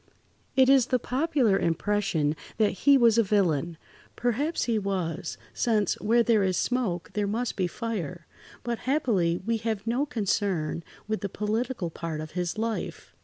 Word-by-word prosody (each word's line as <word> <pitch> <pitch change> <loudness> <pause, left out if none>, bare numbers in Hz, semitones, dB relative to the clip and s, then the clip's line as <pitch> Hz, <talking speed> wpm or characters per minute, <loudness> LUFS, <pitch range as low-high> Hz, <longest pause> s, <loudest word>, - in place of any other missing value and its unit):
It 260 -1 +6
is 265 -2 +5
the 255 - +2
popular 255 -5 +1
impression 170 -3 0 0.2
that 215 -2 +3
he 280 +7 +4
was 235 -2 +5
a - - +5
villain. 175 -6 +1 0.4
Perhaps 275 +7 0
he 230 -3 +1
was, 185 -4 -3 0.2
since 215 -5 +1
"where 230 +4 +4
there 225 -2 +3
is 185 -2 +1
smoke, 220 -9 -1
there 205 -1 0
must 230 +4 -2
be 185 -2 0
fire," 180 -5 -4 0.4
but 235 -1 -2
happily 200 - +2
we 230 0 +1
have 220 -2 -3
no 245 +6 0
concern 195 - -1 0.2
with 215 0 -2
the 200 - -2
political 215 -2 -2
part 160 -1 -5
of 155 0 -6
his 180 +2 -2
life. 225 0 -4
210 Hz, 160 wpm, -27 LUFS, 180-235 Hz, 0.4 s, It